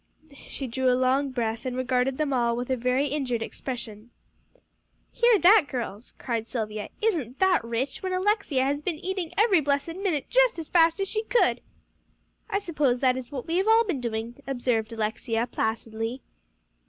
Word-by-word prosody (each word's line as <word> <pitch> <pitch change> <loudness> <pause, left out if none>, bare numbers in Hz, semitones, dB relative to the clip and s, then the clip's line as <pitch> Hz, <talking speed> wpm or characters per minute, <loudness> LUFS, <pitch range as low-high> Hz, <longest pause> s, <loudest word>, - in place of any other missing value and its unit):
She 275 - -5
drew 260 +1 0
a 250 - +2
long 260 +2 +2
breath, 230 -3 -2
and 255 -1 -3
regarded 255 +1 0
them 300 -3 0
all 235 -2 +1
with 245 +2 -3
a - - +3
very 255 +3 0
injured 255 -5 -1
expression. 230 -3 -7 1.0
"Hear 475 -2 +4
that, 380 -3 +6
girls!" 230 -3 -5
cried 230 -3 -3
Silvia; 215 -3 -4
"isn't 300 - 0
that 380 -6 +3
rich, 235 +4 -3
when 375 - -3
Alexia 370 -8 +1
has 285 +2 -1
been 335 +1 -2
eating 370 0 -4
every 410 -4 +5
blessed 285 +4 -1
minute 365 -8 -1
just - - +3
as 325 -2 -6
fast 330 0 +4
as 390 - 0
she 435 +2 -1
could!" 485 - +2 0.9
"I - - +1
suppose 300 -10 0
that 255 -2 +3
is 260 0 -7
what 265 -4 -5
we 340 +3 +1
all 445 +3 +5
have 460 -1 +2
been 290 -10 -2
doing," 230 0 -4
observed 245 -4 -1
Alexia 225 +1 -1
placidly. 225 +1 -3
260 Hz, 175 wpm, -26 LUFS, 235-345 Hz, 1.0 s, that